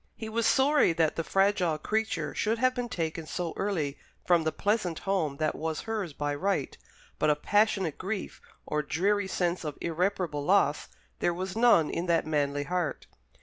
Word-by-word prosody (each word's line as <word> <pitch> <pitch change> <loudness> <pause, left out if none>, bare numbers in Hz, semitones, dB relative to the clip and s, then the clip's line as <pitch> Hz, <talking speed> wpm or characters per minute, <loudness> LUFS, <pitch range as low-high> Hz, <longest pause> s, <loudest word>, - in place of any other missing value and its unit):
He 220 - -6
was 230 +1 +1
sorry 280 - +4
that 160 -1 +1
the 165 - -1
fragile 195 -3 +2
creature 175 -4 -1
should 220 +2 0
have 255 +2 +3
been 245 -1 -3
taken 165 -6 -3
so 170 -1 -3
early 160 -9 -2 0.3
from 175 -2 +4
the 160 - 0
pleasant 195 -2 0
home 170 -8 -1
that 155 0 0
was 160 0 -3
hers 215 -6 -3
by 145 0 -2
right, 165 -1 -1 0.4
but 155 - +3
of 150 0 0
passionate 205 -6 +2
grief, 195 +1 -4 0.2
or 150 - -1
dreary 195 +7 0
sense 180 -1 -1
of 150 -3 -5
irreparable 170 -3 -1
loss, 165 -4 +2 0.3
there 175 - +1
was 185 +2 -4
none 225 -9 +4
in 170 +2 -2
that 170 -1 +2
manly 145 -2 0
heart. 175 0 -2
175 Hz, 175 wpm, -29 LUFS, 155-205 Hz, 0.4 s, sorry